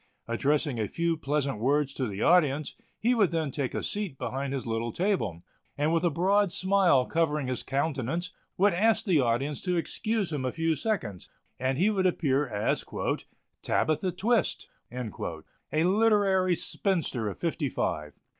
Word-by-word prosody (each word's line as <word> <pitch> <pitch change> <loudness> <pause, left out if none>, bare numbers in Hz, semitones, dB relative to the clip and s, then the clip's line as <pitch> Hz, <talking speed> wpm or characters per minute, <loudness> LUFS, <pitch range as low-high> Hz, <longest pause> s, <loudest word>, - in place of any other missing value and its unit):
Addressing 140 +2 0
a 105 - 0
few 170 - 0
pleasant 140 -5 -1
words 140 +3 +1
to 130 -3 -2
the 100 0 -3
audience, 155 -4 +3 0.3
he 240 +3 +3
would 210 -7 +3
then 160 -4 -1
take 140 -3 -3
a - - -2
seat 205 -9 -3
behind 135 +2 -3
his 135 -3 -3
little 115 0 -2
table, 115 - -1 0.3
and 150 +3 +1
with 165 - +1
a 175 - +4
broad 190 +4 +2
smile 185 -7 +3
covering 150 -3 0
his 125 -1 -2
countenance 140 +4 -2 0.3
would 200 +1 +4
ask 220 +5 +2
the 180 -7 +3
audience 135 +4 0
to 180 -1 -1
excuse 215 +1 -1
him 140 -3 -2
a 130 - -1
few 165 +2 0
seconds, 140 - -3 0.3
and 130 +1 0
he 195 +7 +3
would 190 -3 +2
appear 145 -5 +1
as 105 -3 -1 0.8
"Tabitha 155 +4 +1
Twist," 215 +3 0 0.2
a 120 - -4
literary 195 -2 +3
spinster 160 - -1
of 100 - -7
fifty 160 -4 -1
five. 75 - -2
155 Hz, 160 wpm, -28 LUFS, 130-185 Hz, 0.8 s, a